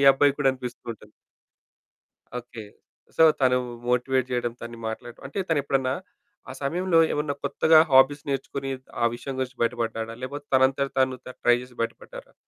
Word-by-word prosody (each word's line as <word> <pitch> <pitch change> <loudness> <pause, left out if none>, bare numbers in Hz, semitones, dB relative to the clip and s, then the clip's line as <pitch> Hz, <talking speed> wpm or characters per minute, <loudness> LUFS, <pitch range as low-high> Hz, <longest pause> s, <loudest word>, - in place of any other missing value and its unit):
ఈ - - +1
అబ్బాయికి 140 +1 +2
గూడా 135 -2 +4
అనిపిస్తూ 125 -2 -8
ఉంటుంది. 105 -1 -17 1.3
ఓకే. 120 -2 -9 0.5
సో - - +5 0.2
తను 125 -1 +4 0.3
మోటివేట్ 130 +1 +1
జేయడం 120 -1 -1
తను 115 0 -8
మాట్లాడ 115 +1 -6
అంటే 140 - -6
తనెప్పుడన్నా 135 -4 +1 0.6
ఆ - - -5
సమయంలో 175 +4 +1
ఏమన్నా 150 -1 -1
కొత్తగా 155 +3 +5
హాబీస్ 140 +3 +5
నేర్చుకొని 135 0 -3 0.3
ఆ - - +4
విషయం 135 +2 -6
గురించి 130 -1 -4
బయటపడ్డాడా? 115 -1 -2
లేపోతే 145 +3 -5
తనంతట 135 +1 +3
తాను 130 -1 +2
తను 125 - -8
ట్రై 120 0 +5
జేసి 125 0 -12
బయటపడ్డారా? 115 0 -6
130 Hz, 150 wpm, -25 LUFS, 120-140 Hz, 1.3 s, సో